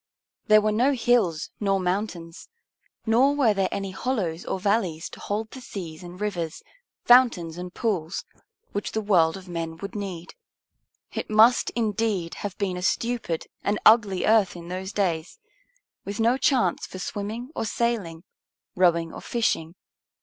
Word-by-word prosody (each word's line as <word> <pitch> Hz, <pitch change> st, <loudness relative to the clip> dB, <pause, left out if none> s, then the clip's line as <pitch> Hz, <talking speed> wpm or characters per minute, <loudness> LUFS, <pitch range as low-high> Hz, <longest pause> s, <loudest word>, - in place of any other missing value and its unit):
There 215 Hz, 0 st, +7 dB
were 215 Hz, 0 st, +1 dB
no 250 Hz, +7 st, +3 dB
hills 230 Hz, -, +1 dB
nor 195 Hz, -2 st, +1 dB
mountains: 180 Hz, -3 st, -3 dB, 0.6 s
nor 250 Hz, +5 st, +4 dB
were 250 Hz, -7 st, +4 dB
there 195 Hz, -2 st, 0 dB
any 195 Hz, -1 st, -3 dB
hollows 190 Hz, -6 st, -2 dB
or 190 Hz, -, -2 dB
valleys 190 Hz, -5 st, 0 dB
to -, -, -11 dB
hold 215 Hz, +2 st, -3 dB
the 260 Hz, -, -9 dB
seas 170 Hz, -9 st, -7 dB
and 175 Hz, 0 st, -10 dB
rivers, 175 Hz, -6 st, -3 dB, 0.4 s
fountains 235 Hz, -10 st, +5 dB
and 180 Hz, +1 st, -6 dB
pools, 190 Hz, -6 st, -2 dB, 0.5 s
which 205 Hz, -, -3 dB
the 220 Hz, -, 0 dB
world 175 Hz, -5 st, +3 dB
of 190 Hz, -1 st, -12 dB
men 165 Hz, -2 st, -4 dB
would 200 Hz, +6 st, -7 dB
need. 190 Hz, -5 st, -6 dB, 0.8 s
It -, -, -4 dB
must, 220 Hz, +3 st, +5 dB
indeed, 210 Hz, -6 st, -1 dB
have 200 Hz, -3 st, -5 dB
been 190 Hz, -3 st, -1 dB
a -, -, -5 dB
stupid 225 Hz, -3 st, -1 dB, 0.2 s
and 205 Hz, +1 st, 0 dB
ugly 210 Hz, -4 st, +5 dB
earth 215 Hz, -4 st, +4 dB
in 170 Hz, 0 st, -9 dB
those 190 Hz, +2 st, -4 dB
days, 175 Hz, -6 st, -1 dB, 0.7 s
with 200 Hz, +2 st, -6 dB
no 230 Hz, +3 st, +4 dB
chance 255 Hz, -, +1 dB
for -, -, -9 dB
swimming 215 Hz, +7 st, -5 dB
or -, -, -2 dB
sailing, 205 Hz, -8 st, -2 dB, 0.5 s
rowing 170 Hz, -2 st, +2 dB
or -, -, -8 dB
fishing. 175 Hz, -8 st, -1 dB
200 Hz, 155 wpm, -25 LUFS, 175-225 Hz, 0.8 s, There